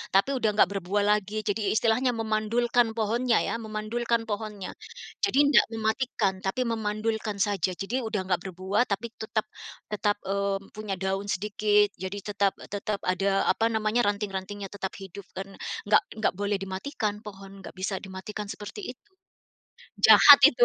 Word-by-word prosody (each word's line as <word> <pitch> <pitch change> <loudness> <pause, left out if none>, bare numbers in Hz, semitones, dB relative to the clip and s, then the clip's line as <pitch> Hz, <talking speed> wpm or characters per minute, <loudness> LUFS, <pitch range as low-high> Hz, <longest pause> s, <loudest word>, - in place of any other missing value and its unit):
tapi 195 +8 +4
udah 220 - +2
nggak 190 - +5
berbuah 195 +2 0 0.2
lagi, 210 +2 -5
jadi 205 0 0
istilahnya 235 +3 +2
memandulkan 225 +2 +1
pohonnya 230 +2 +1
ya, - - -2
memandulkan 225 +2 -2
pohonnya. 210 -2 -4 0.5
Jadi 400 -9 +2
ndak - - +7
mematikan 220 -2 0
tapi 195 +6 -1
memandulkan 220 -1 -2
saja, 195 -3 0
jadi 210 +8 -2
udah 220 -2 -1
enggak 180 -2 +1
berbuah 190 +4 0
tapi 215 +3 -3
tetap 220 0 -2 0.5
tetap, 205 0 +1
eee, 200 0 0 0.2
punya 210 -2 -3
daun 195 +1 -2
sedikit, 210 +1 +2
jadi 190 +2 -4
tetap 200 -1 +1 0.2
tetap 205 0 -2
ada 195 +2 +1
apa 225 - +1
namanya, 220 +2 +1
ranting-rantingnya 200 -1 -3
tetap 195 -2 -4
hidup 195 +1 -9
kan 195 +1 -5 0.4
enggak 210 - +5
enggak 220 - +1
boleh 205 +1 -1
dimatikan 205 +2 -3
pohon, 195 -1 -10
enggak - - -10
bisa 190 +1 -2
dimatikan 195 +2 -6
seperti 210 - -7
itu. 260 +11 -22 0.9
Jahat - - +9
itu! 485 - +4
210 Hz, 150 wpm, -27 LUFS, 195-220 Hz, 0.9 s, Jahat